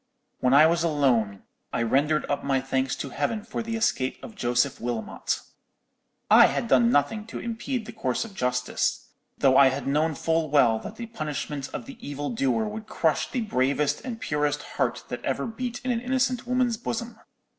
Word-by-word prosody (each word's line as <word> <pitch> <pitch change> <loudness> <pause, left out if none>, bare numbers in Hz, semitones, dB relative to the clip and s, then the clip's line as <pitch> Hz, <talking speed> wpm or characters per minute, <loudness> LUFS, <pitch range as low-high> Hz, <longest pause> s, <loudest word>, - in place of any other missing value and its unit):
"When 130 +1 +3
I 150 +2 +8
was 170 +1 +2
alone, 125 - +1 0.3
I 115 - 0
rendered 145 +6 +2
up 145 - -1
my 135 -1 +1
thanks 130 0 -1
to 140 - -6
Heaven 175 - -1
for 225 +1 -4
the 230 0 -3
escape 130 -12 0
of 235 - -8
Joseph 125 - 0
Wilmot. 120 -2 -2 0.9
I - - +8
had - - -2
done 120 -3 +5
nothing 210 - +1
to - - -6
impede 235 +1 -3
the 225 - -7
course 130 - -2
of 220 - -11
justice, 125 -5 -1 0.3
though 130 -1 +4
I 140 - +8
had 135 +2 -4
known 150 +3 +1
full 160 +1 0
well 125 -6 +4
that 210 - -8
the 235 - -6
punishment 150 -9 -4
of - - -5
the 270 -3 -11
evil 145 -3 -4
doer 220 - +1
would 215 0 -6
crush 160 -6 0
the 250 - -2
bravest 140 - 0
and 240 -3 -5
purest 150 -3 -1
heart - - -2
that - - -5
ever - - -1
beat 245 +1 -4
in 255 - +1
an 230 -1 -1
innocent 250 -1 0
woman's 250 -2 +1
bosom. 235 +1 -4
150 Hz, 190 wpm, -26 LUFS, -, 0.9 s, I